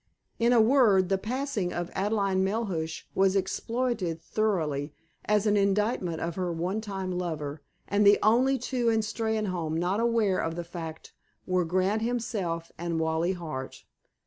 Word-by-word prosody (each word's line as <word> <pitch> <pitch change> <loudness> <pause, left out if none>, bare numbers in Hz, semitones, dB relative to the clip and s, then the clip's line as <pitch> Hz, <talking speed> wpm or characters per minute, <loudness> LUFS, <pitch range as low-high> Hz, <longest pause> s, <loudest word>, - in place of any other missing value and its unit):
In 235 +1 +3
a 240 - +5
word, 220 -6 +5
the 195 -1 +1
passing 225 -4 -2
of 175 0 -4
Adelaide 195 -1 +1
Melhuish 190 -5 -1
was 195 0 +3
exploited 200 -2 -1
thoroughly 155 -9 -1 0.3
as 210 0 +2
an 210 -1 +3
indictment 200 -4 +1
of 170 0 -2
her 180 0 -2
one 180 +6 -2
time 195 -3 -4
lover, 160 -5 -3 0.3
and 205 +1 +2
the 205 0 +7
only 255 +5 +4
two 245 -1 0
in 225 -1 +2
Steynholme 210 -7 -2
not 180 +5 0
aware 230 -5 +2
of 165 0 -2
the 175 - -3
fact 165 -2 -8 0.3
were 185 -1 +1
Grant, 185 +5 +1
himself, 220 -9 -2
and 170 -1 -2
Wally 160 +3 +1
Hart. 155 -7 -6
190 Hz, 150 wpm, -28 LUFS, 170-220 Hz, 0.3 s, the